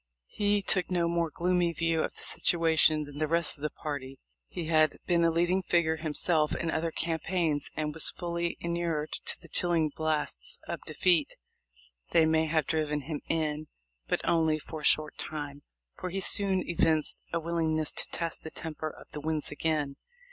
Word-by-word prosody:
He 205 -1 +1
took 185 -2 +1
no 175 -2 +1
more 170 -1 +1
gloomy 175 +2 +1
view 165 0 +1
of - - -3
the - - -6
situation 160 -2 +3
than 145 0 -9
the 155 - +1
rest 165 -1 0
of - - -17
his 150 - -1
party. 135 -3 -4 0.3
He 175 -3 -5
had 155 -1 +3
been 170 -1 +3
a 165 - +5
leading 175 +3 +2
figure 170 -3 +2
himself 155 0 +1
in 165 - -1
other 165 +1 0
campaigns, 165 -2 -1
and 150 -1 -2
was 160 - +4
fully 170 -1 -3
inured 170 -3 -2
to - - -4
the - - -14
chilling 170 -3 +1
blasts 155 -1 -1
of - - -4
defeat. 175 -5 +2 0.8
They 165 -1 +6
may 160 0 +3
have 155 -2 +1
driven 150 -1 0
him 150 +1 -5
in, 155 -1 -1 0.4
but - - -1
only 160 -2 +3
for 155 +1 -7
a - - -13
short 155 0 +2
time, 145 -2 -5 0.4
for 185 - -3
he 195 +2 -3
soon 195 -1 +3
evinced 160 -2 +2
a 170 - 0
willingness 160 -2 0
to - - 0
test 170 -1 -2
the 160 - -6
temper 155 -1 -5
of - - -13
the 150 - -6
winds 155 0 -2
again. 150 -2 -1
160 Hz, 180 wpm, -29 LUFS, 155-170 Hz, 0.8 s, They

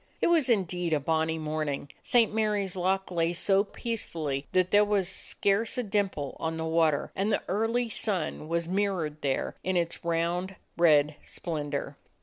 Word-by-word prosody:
It - - +2
was 315 -7 +4
indeed 180 -6 +1
a 150 - +3
bonny 160 +2 0
morning. 155 -2 -3
St. 230 -3 +3
Mary's 210 -4 0
Loch 190 +1 0
lay 170 -1 +1
so 195 +3 +3
peacefully 165 - -4
that 185 0 +2
there 205 0 +6
was 205 -3 +1
scarce 200 +5 0
a 250 - 0
dimple 195 - -1
on 160 0 -2
the 160 - -3
water, 160 -2 +1
and 200 +3 0
the 205 - 0
early 225 +5 0
sun 190 -8 -2
was 170 0 -1
mirrored 180 -6 -1
there 135 -2 -1
in 185 -1 0
its 170 -1 -1
round, 170 +3 -1 0.2
red 150 -3 +4
splendor. 145 -4 -4
175 Hz, 160 wpm, -28 LUFS, 160-200 Hz, 0.2 s, there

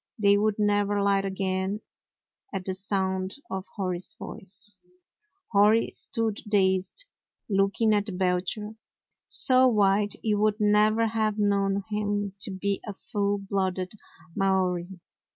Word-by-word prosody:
They 200 -2 +4
would 210 0 +1
never 205 -1 +1
light 200 -1 +2
again 190 +1 -2 0.7
at 185 - -4
the 190 - -1
sound 190 -1 -1 0.2
of 190 0 -4
Hori's 185 -3 -2
voice. 200 +1 -7 0.7
Hori 210 +2 +4
stood 225 -4 -2
dazed, 190 - +1 0.4
looking 200 +2 +2
at 205 -2 -1
Belcher 190 +4 -1 0.3
— - - -50
so 255 0 +6
white 205 -2 +2
you 210 -2 +1
would 215 +1 +1
never 210 +2 +3
have 220 -1 0
known 200 -1 +1
him 205 -1 -1
to 200 - -3
be 195 +1 -2
a 210 - -4
full 200 +1 -2
blooded 190 -2 -2 0.4
Maori. 185 -1 0
200 Hz, 125 wpm, -26 LUFS, 190-210 Hz, 0.7 s, so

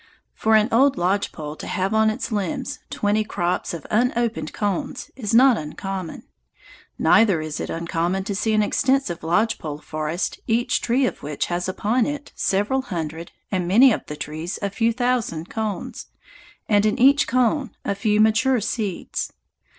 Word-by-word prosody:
For 220 0 +2
an 215 0 +5
old 265 +2 +4
lodge 185 +3 0
pole 150 -1 -7
to - - -7
have 190 +2 -1
on 220 0 +4
its 215 +3 -3
limbs 200 -5 -2
twenty 210 +1 +1
crops 175 -4 -2
of 170 -4 -7
unopened 235 0 0
cones 200 -4 -3
is 225 -6 -3
not 245 +1 +6
uncommon. 180 +3 -6 0.7
Neither 205 -7 +4
is 155 -1 -4
it - - -4
uncommon 170 +3 -1
to 200 +1 -3
see 215 +3 0
an 215 0 +3
extensive 260 -5 +1
lodge 195 +8 +1
pole 150 -2 -5
forest 155 +3 -3
each 235 +1 +1
tree 250 +3 +2
of - - -3
which 145 0 -2
has 175 +1 -1
upon 220 +5 +1
it 290 0 -5
several 205 +7 +1
hundred, 165 - -5 0.2
and 185 -3 -1
many 240 +8 +7
of - - 0
the 150 - -5
trees 155 +5 -5
a 200 - -1
few 230 +3 +1
thousand, 230 -9 -1
cones, 220 -3 -4 0.6
and 205 -1 +3
in 215 - 0
each 275 +3 +5
cone 255 +2 +1 0.2
a - - 0
few 210 +1 +1
mature 235 +4 +4
seeds. 205 -3 -3
210 Hz, 165 wpm, -23 LUFS, 175-235 Hz, 0.7 s, many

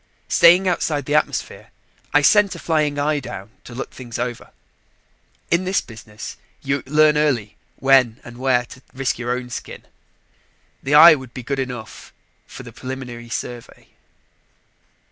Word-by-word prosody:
Staying 175 +3 +6
outside 155 -5 -1
the 145 - -2
atmosphere, 150 - -1 0.4
I 145 - +3
sent 205 +3 +4
a - - -8
flying 150 -3 0
eye 145 +1 0
down 100 -5 -9
to 120 - -10
look 130 - -6
things 120 -3 -8
over. 120 -1 -5 1.0
In 170 +2 +2
this 185 +1 +1
business, 110 -1 -10 0.3
you 140 0 -1
learn 150 +1 +4
early 120 -9 0 0.2
when 135 -3 +3
and 120 0 -12
where 125 -2 +1
to 130 - -14
risk 130 -1 -2
your 120 0 -4
own 125 0 -3
skin. - - -8 1.0
The 145 +2 +1
eye 165 +2 +10
would 130 -4 -7
be 130 - -6
good 135 +2 -3
enough 125 -4 -7 0.3
for - - -10
the - - -12
preliminary 125 -2 -8
survey. 120 +1 -7
130 Hz, 150 wpm, -21 LUFS, 120-150 Hz, 1.0 s, eye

